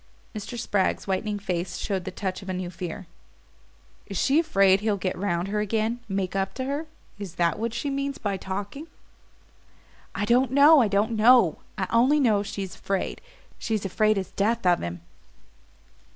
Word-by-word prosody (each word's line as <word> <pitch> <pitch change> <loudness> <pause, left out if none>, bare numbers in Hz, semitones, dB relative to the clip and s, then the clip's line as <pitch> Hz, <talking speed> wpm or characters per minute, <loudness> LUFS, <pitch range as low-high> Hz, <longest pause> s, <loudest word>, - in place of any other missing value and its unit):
Mr. 215 +2 -6
Spragg's 200 -4 0
whitening 205 +2 -1
face 180 -2 -3
showed 190 -3 -3
the - - -3
touch 185 0 -4
of 190 - -9
a - - -1
new 180 -1 -4
fear. 175 +1 -6 1.0
"Is 195 - -5
she 280 +3 +3
afraid 195 - +4
he'll 210 -1 0
get 185 -1 -2
round 180 -1 -1
her 210 +1 -1
again 220 +3 -1
make 195 -1 -2
up 195 0 -1
to 260 - -3
her? 285 +4 -3 0.3
Is 190 -4 -7
that 170 -1 +1
what 230 +1 -1
she 280 +5 -3
means 275 0 -2
by 200 -2 -2
'talking'?" 200 - -5 1.3
"I 205 - -1
don't 245 +3 +3
know, 285 +3 +7
I 230 - +3
don't 205 +3 +1
know. 225 -5 +5 0.2
I 190 - 0
only 255 +6 +4
know 220 -7 +3
she 200 -1 -4
is 190 - -7
afraid 195 -1 -3 0.4
she's 215 -3 -2
afraid 215 +3 +2
as 190 -2 -3
death 225 +2 0
of 175 -1 +4
him." 85 0 -5
205 Hz, 180 wpm, -25 LUFS, 190-235 Hz, 1.3 s, know